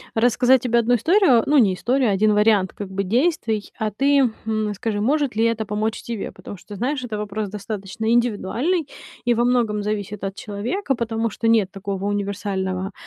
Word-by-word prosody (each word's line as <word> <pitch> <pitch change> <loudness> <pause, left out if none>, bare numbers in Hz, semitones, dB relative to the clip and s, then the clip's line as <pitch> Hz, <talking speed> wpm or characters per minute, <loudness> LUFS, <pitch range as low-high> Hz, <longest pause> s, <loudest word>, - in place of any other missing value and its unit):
рассказать 245 +2 +4
тебе 235 -1 +2
1 235 +1 +3
историю, 270 - +4
ну, 295 - +4
не 210 -8 +5
историю, 250 +6 +1
а - - +2
1 210 +2 +3
вариант 210 -2 +3
как 200 -2 -7
бы, 195 +1 -2
действий, 225 - 0
а 220 - 0
ты, 275 +3 +3 0.2
хм, 215 -1 -1
скажи, 205 +1 -3
может 280 +3 +1
ли 225 - +2
это 230 -1 0
помочь 215 +2 -2
тебе? 230 -4 -5
Потому - - -10
что - - -21
ты - - -9
знаешь, 255 +4 -2
это 225 -4 -4
вопрос 210 0 -4
достаточно 205 0 -6
индивидуальный 240 - 0 0.4
и 240 - +3
во 235 +1 +1
многом 230 -4 +1
зависит 210 -1 -4
от 195 0 -3
человека, 240 - -3
потому 230 -1 -1
что 225 +2 -3
нет 220 -4 +3
такого 195 -1 -5
универсального, 195 -2 -2
220 Hz, 190 wpm, -22 LUFS, 205-245 Hz, 0.4 s, не